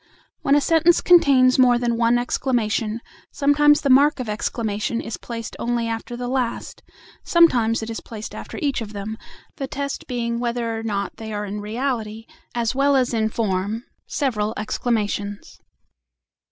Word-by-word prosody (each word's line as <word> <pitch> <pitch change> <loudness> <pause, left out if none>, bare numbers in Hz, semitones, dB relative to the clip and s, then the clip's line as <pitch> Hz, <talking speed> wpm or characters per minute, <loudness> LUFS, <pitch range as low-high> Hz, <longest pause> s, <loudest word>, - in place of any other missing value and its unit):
When 280 - +3
a 290 - +4
sentence 330 +3 +4
contains 270 -7 +5
more 250 -1 +6
than 240 -1 0
one 235 +1 +3
exclamation, 235 -3 -1 0.3
sometimes 295 +1 +4
the 280 - 0
mark 285 +2 +5
of 250 - -4
exclamation 215 +1 -2
is 225 - -5
placed 230 -1 -7
only 235 -1 -1
after 230 +1 -4
the 245 0 -4
last, 250 -2 -3 0.4
sometimes 235 -10 +3
it 220 - -6
is 225 - -5
placed 220 -2 -8
after - - -8
each 280 -4 0
of 215 -1 -7
them, 205 +2 -5 0.4
the 275 -3 -3
test 280 +1 -4
being 235 -1 -2
whether 235 -1 -2
or 225 - -4
not 200 -3 -3
they 220 -1 -7
are 210 0 -3
in 205 +1 -5
reality, 225 -1 -3 0.3
as 235 -1 0
well 280 +1 +3
as 255 -2 +2
in 220 -1 +1
form, 210 +1 -2 0.2
several 220 -6 -1
exclamations. 205 -2 -2
235 Hz, 160 wpm, -22 LUFS, 220-260 Hz, 0.4 s, more